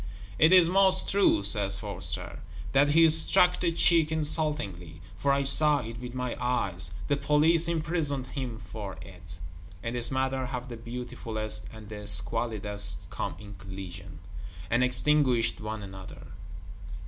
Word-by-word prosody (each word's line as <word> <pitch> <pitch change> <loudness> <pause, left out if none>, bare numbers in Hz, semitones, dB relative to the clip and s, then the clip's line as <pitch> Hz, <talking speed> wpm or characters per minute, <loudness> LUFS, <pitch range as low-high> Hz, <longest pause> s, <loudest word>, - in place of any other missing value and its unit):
"It 160 +2 +5
is 180 -3 +7
most 190 +1 +3
true," 195 - +3
says 100 -1 +5
Forster, - - -3 0.3
"that 140 +2 +3
he 165 +2 +5
struck 180 +3 +4
the 170 -2 0
cheek 165 -1 +3
insultingly; 150 - -2 0.2
for 140 - +1
I 140 0 +1
saw 150 +1 +4
it 115 0 -8
with 125 0 -8
my 125 -1 -3
eyes; 100 -9 -2 0.2
the 145 - +1
Police 150 +4 +2
imprisoned 155 -5 -1
him 125 -7 -6
for 100 -3 -7
it." 90 -1 -12 0.5
In 115 - -4
this 120 -1 -1
manner 130 0 -2
have 125 0 -6
the 120 - -7
Beautifulest 115 -2 -5
and 110 -2 -12
the 105 -1 -8
Squalidest 105 -2 -1
come - - -4
in 100 +1 -11
collision, 95 -4 -9 0.5
and 120 +2 +2
extinguished 125 -1 +2
one 110 0 -5
another. 95 -1 -11
125 Hz, 145 wpm, -27 LUFS, 105-150 Hz, 0.5 s, is